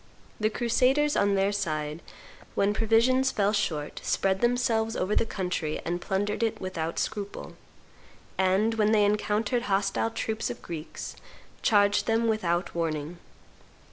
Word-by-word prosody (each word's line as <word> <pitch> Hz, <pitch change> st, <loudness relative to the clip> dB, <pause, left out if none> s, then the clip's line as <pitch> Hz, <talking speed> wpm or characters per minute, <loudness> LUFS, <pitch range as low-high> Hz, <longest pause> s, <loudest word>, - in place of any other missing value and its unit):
The 215 Hz, 0 st, +2 dB
crusaders, 255 Hz, +6 st, +2 dB
on 200 Hz, 0 st, +3 dB
their 195 Hz, +1 st, +2 dB
side, 155 Hz, -5 st, -2 dB, 0.5 s
when 200 Hz, +1 st, +2 dB
provisions 230 Hz, +4 st, +3 dB
fell 205 Hz, -4 st, +1 dB
short, 155 Hz, -8 st, -2 dB
spread 190 Hz, 0 st, +1 dB
themselves 235 Hz, -2 st, +1 dB
over 190 Hz, +3 st, 0 dB
the 225 Hz, -, +2 dB
country 180 Hz, -6 st, -2 dB
and 175 Hz, +1 st, -2 dB
plundered 205 Hz, +4 st, -1 dB
it 225 Hz, -1 st, 0 dB
without 165 Hz, -3 st, -4 dB
scruple; 205 Hz, -2 st, -4 dB, 0.8 s
and, 190 Hz, +4 st, +2 dB
when 215 Hz, -1 st, +2 dB
they 210 Hz, -1 st, +5 dB
encountered 210 Hz, +3 st, 0 dB
hostile 195 Hz, +3 st, +1 dB
troops 225 Hz, -1 st, -3 dB
of -, -, -7 dB
Greeks, 165 Hz, -2 st, -7 dB, 0.5 s
charged 205 Hz, -1 st, +3 dB
them 225 Hz, +1 st, +2 dB
without 180 Hz, -5 st, 0 dB
warning. 165 Hz, 0 st, -3 dB
205 Hz, 135 wpm, -27 LUFS, 185-225 Hz, 0.8 s, they